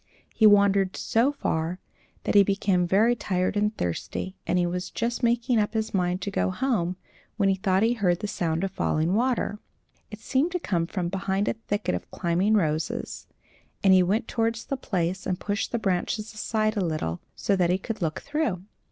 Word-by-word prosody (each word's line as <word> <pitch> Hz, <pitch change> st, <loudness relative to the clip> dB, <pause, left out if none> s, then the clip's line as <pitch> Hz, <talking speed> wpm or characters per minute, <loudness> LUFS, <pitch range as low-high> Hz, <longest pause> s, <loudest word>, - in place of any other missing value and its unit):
He 220 Hz, -, +6 dB
wandered 200 Hz, -2 st, +4 dB
so 245 Hz, +4 st, +2 dB
far 170 Hz, -, -2 dB, 0.5 s
that -, -, 0 dB
he 205 Hz, -, +8 dB
became 195 Hz, -2 st, +1 dB
very 220 Hz, +7 st, +4 dB
tired 185 Hz, -4 st, -1 dB
and 210 Hz, +1 st, 0 dB
thirsty, 90 Hz, -, -3 dB
and 180 Hz, -, +2 dB
he 175 Hz, -, +2 dB
was 180 Hz, +1 st, -3 dB
just 235 Hz, +1 st, -2 dB
making 235 Hz, 0 st, +2 dB
up 210 Hz, +1 st, -1 dB
his 220 Hz, 0 st, -1 dB
mind 180 Hz, -1 st, 0 dB
to 200 Hz, -, -3 dB
go 195 Hz, -, 0 dB
home, 185 Hz, -4 st, 0 dB, 0.4 s
when 200 Hz, -3 st, +3 dB
he -, -, +4 dB
thought 190 Hz, +1 st, +1 dB
he 230 Hz, +2 st, +3 dB
heard 180 Hz, -7 st, +1 dB
the 210 Hz, -, -3 dB
sound 170 Hz, -4 st, -1 dB
of 195 Hz, -, -1 dB
falling 160 Hz, -1 st, 0 dB
water. 235 Hz, -2 st, 0 dB, 0.5 s
It 210 Hz, -, -8 dB
seemed 275 Hz, +9 st, 0 dB
to 360 Hz, -, 0 dB
come 170 Hz, -, -1 dB
from 180 Hz, -2 st, -2 dB
behind 195 Hz, +1 st, -1 dB
a -, -, +2 dB
thicket 210 Hz, -, -2 dB
of 90 Hz, -, -4 dB
climbing 185 Hz, +5 st, +1 dB
roses; 155 Hz, -5 st, -1 dB, 0.6 s
and 195 Hz, -1 st, +6 dB
he 185 Hz, -, +7 dB
went 210 Hz, +6 st, +1 dB
towards 230 Hz, 0 st, -1 dB
the 275 Hz, -, -2 dB
place 185 Hz, -7 st, -2 dB
and 185 Hz, -, -1 dB
pushed 205 Hz, +1 st, -2 dB
the 235 Hz, -, 0 dB
branches 210 Hz, +1 st, -1 dB
aside 215 Hz, 0 st, 0 dB
a 205 Hz, -, 0 dB
little, 155 Hz, -, -2 dB
so 200 Hz, -, +1 dB
that 180 Hz, -2 st, +2 dB
he 180 Hz, -, +3 dB
could 215 Hz, +3 st, -6 dB
look 160 Hz, -2 st, -2 dB
through. 285 Hz, -, -2 dB
195 Hz, 195 wpm, -26 LUFS, 180-220 Hz, 0.6 s, he